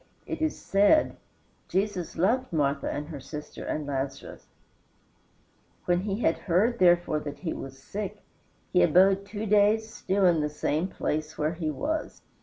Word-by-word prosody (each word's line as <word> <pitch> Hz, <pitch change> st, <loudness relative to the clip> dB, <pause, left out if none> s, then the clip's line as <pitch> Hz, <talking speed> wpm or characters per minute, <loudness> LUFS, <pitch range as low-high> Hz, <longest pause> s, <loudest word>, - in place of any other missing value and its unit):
It -, -, -5 dB
is 315 Hz, -1 st, 0 dB
said, 205 Hz, +11 st, +3 dB, 0.5 s
"Jesus 190 Hz, -2 st, -2 dB
loved 245 Hz, +9 st, +1 dB
Martha 140 Hz, -3 st, 0 dB
and 145 Hz, +1 st, -4 dB
her 150 Hz, -4 st, -6 dB
sister 150 Hz, +2 st, -8 dB
and 150 Hz, -, -3 dB
Lazarus; 135 Hz, -1 st, -5 dB, 1.4 s
when 175 Hz, 0 st, +2 dB
he 200 Hz, +3 st, -3 dB
had 165 Hz, -, +2 dB
heard, 205 Hz, +7 st, +1 dB
therefore, 175 Hz, -3 st, +4 dB
that 145 Hz, -1 st, -6 dB
he 170 Hz, -4 st, -3 dB
was 135 Hz, 0 st, -8 dB
sick, 195 Hz, +8 st, -6 dB, 0.5 s
he -, -, +5 dB
abode 190 Hz, -, +4 dB
two 210 Hz, +1 st, -5 dB
days 215 Hz, +2 st, +3 dB
still 195 Hz, +1 st, 0 dB
in 170 Hz, -3 st, +4 dB
the 150 Hz, -, 0 dB
same 150 Hz, +3 st, -1 dB
place 155 Hz, -4 st, -3 dB
where 155 Hz, +2 st, 0 dB
he 165 Hz, -2 st, -3 dB
was." 305 Hz, -, -3 dB
180 Hz, 155 wpm, -27 LUFS, 150-205 Hz, 1.4 s, he